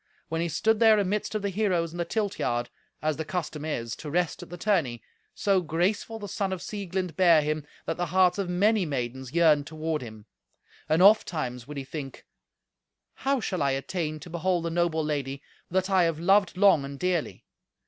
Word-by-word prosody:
When 165 +1 -1
he 170 - -1
stood 220 +7 +1
there 220 -2 +6
amidst 205 +2 -1
of 210 - -2
the 200 - -1
heroes 180 -5 0
in 175 - -8
the 170 - 0
tilt 205 +2 -2
yard, 120 0 -1 0.3
as 155 -1 0
the 160 - -2
custom 155 -2 -4
is, 115 -7 -3
to 150 - -7
rest 175 +2 0
at - - -10
the 175 - -7
tourney, 165 - 0 0.3
so 195 -2 +2
graceful 180 +7 -1
the 205 -2 -7
son 195 -1 -2
of 190 - -3
Sieglind 185 -4 -4
bare 170 -4 +5
him, 150 0 -2 0.2
that - - -2
the 175 0 -1
hearts 185 +3 +3
of 190 -3 -2
many 205 +4 +3
maidens 130 -4 -4
yearned 155 -3 +4
toward 155 0 -3
him. 110 -3 -10 0.6
And 160 +3 +4
ofttimes 155 - +3
would 150 0 -7
he 140 - -3
think, 135 0 -8 0.9
"How 275 0 0
shall 185 -6 -2
I 140 -1 +2
attain 155 +3 -3
to - - -10
behold 175 0 0
the 165 - -2
noble 165 -2 +1
lady 140 -2 -3 0.3
that 185 +1 +1
I 185 -2 +5
have 165 -2 -1
loved 195 +1 +3
long 195 -7 +5
and 140 0 -7
dearly? 180 -1 -2
170 Hz, 200 wpm, -27 LUFS, 150-190 Hz, 0.9 s, there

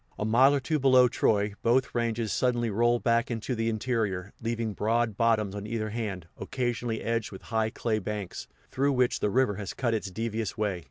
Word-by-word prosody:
A 105 - -2
mile 130 +6 +5
or - - +1
two 155 +3 -1
below 130 -2 +6
Troy, 105 -3 +1
both 125 +3 +2
ranges 115 -2 -1
suddenly 120 -3 +1
roll 120 +3 +3
back 115 0 +1
into 115 +2 -3
the 115 -1 0
interior, 110 -5 -2
leaving 115 -1 -2
broad 110 +2 0
bottoms 110 -3 +2
on 105 0 -6
either 110 -1 -3
hand, 100 -7 -4
occasionally 120 -3 -2
edged 115 -2 -1
with 95 - -10
high 110 0 +2
clay 110 -1 -1
banks, 105 -2 -5 0.2
through 140 +1 +1
which 125 -1 +2
the 105 - +1
river 125 -2 +2
has 100 -2 -5
cut 120 -3 0
its 105 -3 -2
devious 110 +1 -3
way. 105 -4 -1
115 Hz, 195 wpm, -28 LUFS, 105-120 Hz, 0.2 s, below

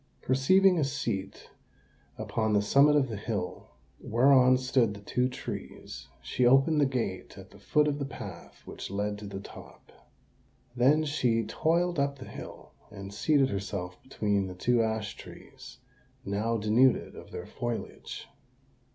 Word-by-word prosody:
Perceiving 180 +8 +4
a - - +2
seat 135 -9 -4 0.7
upon 110 -1 -1
the 105 - +4
summit 140 +7 +5
of 140 -2 +3
the 115 - -5
hill, 105 -3 -4 0.3
whereon 130 +2 +5
stood 125 -4 +1
the - - -9
two 125 +5 0
trees, 70 - -8 0.2
she 65 - -1
opened 135 +5 +5
the 140 - +4
gate 120 -8 -4
at - - -12
the - - -16
foot 150 0 +2
of 145 0 -1
the 140 - -2
path 100 -10 -10
which - - -7
led 105 +1 -2
to 105 - -8
the 100 -1 -6
top. - - -13 0.8
Then 140 +6 +4
she 125 -6 +1
toiled 170 0 0
up 140 0 0
the 130 - -9
hill, - - -10 0.2
and 100 -1 -9
seated 140 +3 +2
herself 95 -2 -5
between 105 -6 -1
the 90 - -8
two 120 +6 +2
ash 110 -2 -2
trees—now 125 -3 -7
denuded 115 +4 +2
of - - -11
their - - -7
foliage. 120 -1 -6
125 Hz, 150 wpm, -29 LUFS, 105-135 Hz, 0.8 s, summit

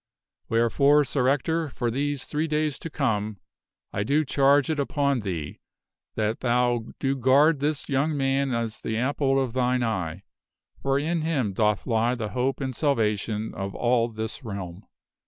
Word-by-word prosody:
Wherefore, 140 +6 +4
Sir 130 -2 0
Ector, 155 +4 +1
for 120 -3 -2
these 140 +2 -2
three 155 +2 -1
days 150 -2 -1
to 165 - -6
come, 110 -8 -1 0.6
I - - -1
do 145 +9 +1
charge 140 +2 +3
it 155 - -2
upon 140 -1 +1
thee 85 -8 -5 0.6
that 110 +1 -1
thou 120 -1 +1
do 135 0 0
guard 135 +4 +4
this 145 +1 -1
young 145 +2 0
man 135 0 +1
as 115 -2 -2
the 110 - -2
apple 135 +2 +1
of 130 -4 -1
thine 125 -1 +1
eye, 95 -5 -2 0.6
for 135 0 +1
in 160 +3 0
him 140 -11 0
doth 105 -1 +1
lie 115 +1 +1
the 110 -3 -4
hope 130 +4 -1
and 130 -2 -3
salvation 110 -6 0
of 95 0 -5
all 120 -1 +2
this 110 +4 -6
realm." 100 -4 -7
130 Hz, 160 wpm, -25 LUFS, 110-140 Hz, 0.6 s, Wherefore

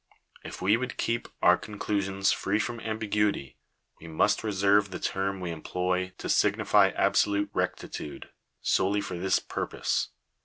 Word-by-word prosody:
If - - -8
we 100 +4 +4
would 125 +1 -4
keep 115 0 -1 0.2
our - - +6
con 105 - -9
f - - -10
elusions 100 -1 +1
free 100 +2 0
from 115 +2 -2
ambiguity, 105 - -1 0.4
we 85 - -11
must 100 +7 +1
reserve 100 -1 +3
the 95 - -5
term 95 0 -2
we 90 -2 -4
em; 80 -2 -7
ploy 90 0 -1
to - - -6
signify - - +4
absolute 100 0 +2
rectitude, 75 - -4 0.3
solely 100 +2 +2
for 90 -3 -5
this 95 +1 +2
purpose. - - -2
100 Hz, 155 wpm, -28 LUFS, 95-105 Hz, 0.4 s, our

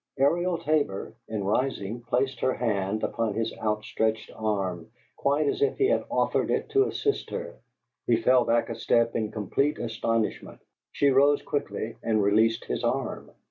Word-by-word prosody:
Ariel 175 +6 +2
Tabor, 150 - -1
in 110 -2 -3
rising, 110 +1 -1
placed 125 +3 -1
her 130 - +1
hand 105 -3 -1
upon 115 -3 -1
his 115 0 -1
out 105 0 -1
stretched 110 0 -1
arm, 95 -6 -2 0.3
quite 145 +2 +1
as 145 - -1
if 430 - +2
he 400 - +3
had - - +1
offered - - +1
it - - -1
to 405 0 +4
assist 425 -1 -1
her; - - -6 0.5
he 120 - +4
fell 125 +2 +4
back 120 0 +1
a - - -3
step 115 +1 +1
in 110 -2 0
complete 135 +8 0
astonishment; 115 -1 -2 0.3
she 140 - +2
rose 140 +2 +4
quickly, 110 -4 -3
and 110 -2 +1
released 110 +3 +3
his - - -3
arm. - - -2
115 Hz, 165 wpm, -27 LUFS, 110-140 Hz, 0.5 s, to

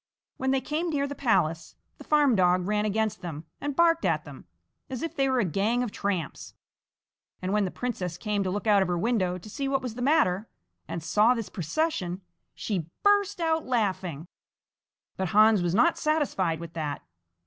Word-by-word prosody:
When 265 - -1
they 265 0 +2
came 315 +5 -2
near 285 -3 0
the 285 - -4
palace, 185 - 0 0.2
the - - -9
farm 295 -5 +3
dog 180 -1 +3
ran 210 +1 0
against 215 -2 -1
them 165 -3 -6 0.2
and 290 -1 -3
barked 335 0 +4
at - - +1
them, - - -12 0.4
as 260 +1 -5
if 330 0 -4
they 270 -3 +2
were 260 - +1
a 225 - +2
gang 210 +8 +1
of 240 - -4
tramps, 195 -6 -3 0.8
and 185 +2 -2
when 210 -1 +2
the - - -2
princess 180 -7 -4
came 205 +1 -1
to 190 - -1
look 205 +3 -3
out 205 -2 +5
of 190 - +1
her 175 -1 0
window 185 -3 0
to 180 - -12
see 275 +6 -3
what 270 -1 0
was 250 -3 -4
the 245 - -7
matter, 225 - +2 0.4
and 165 - -5
saw 215 +8 +4
this 230 -3 -4
procession, 185 - -2 0.3
she 180 -7 -3
burst 405 -2 +3
out 325 -1 0
laughing. 190 - -1 0.9
But 190 - -1
Hans 215 -2 +6
was 175 0 0
not 320 +10 +3
satisfied 270 - 0
with 170 -1 -8
that. 150 -3 -4
210 Hz, 190 wpm, -27 LUFS, 180-270 Hz, 0.9 s, Hans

